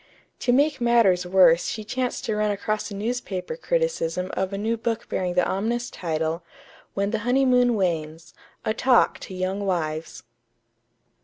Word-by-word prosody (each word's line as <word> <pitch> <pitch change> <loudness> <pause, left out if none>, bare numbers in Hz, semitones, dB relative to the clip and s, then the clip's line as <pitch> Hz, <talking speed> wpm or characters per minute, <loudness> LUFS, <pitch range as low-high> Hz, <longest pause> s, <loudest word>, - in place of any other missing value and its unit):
To 245 - +1
make 285 +1 +2
matters 220 -7 +3
worse 180 -2 +5
she 215 - -4
chanced 250 +3 -3
to 220 - -1
run 210 0 +1
across 215 +2 -2
a 200 - -7
newspaper 215 - -3
criticism 485 - -1
of 190 0 -1
a 195 - -3
new 220 +3 0
book 230 0 -3
bearing 180 -1 -2
the 180 - +3
ominous 235 +5 -2
title: 160 0 -2 0.5
"When 200 +1 0
the 225 - -1
Honeymoon 250 0 +3
Wanes 165 -4 -2 0.3
A 215 - +1
Talk 250 +2 +3
to 190 - -8
Young 185 +2 -2
Wives." 160 -4 -3
205 Hz, 155 wpm, -24 LUFS, 180-240 Hz, 0.5 s, worse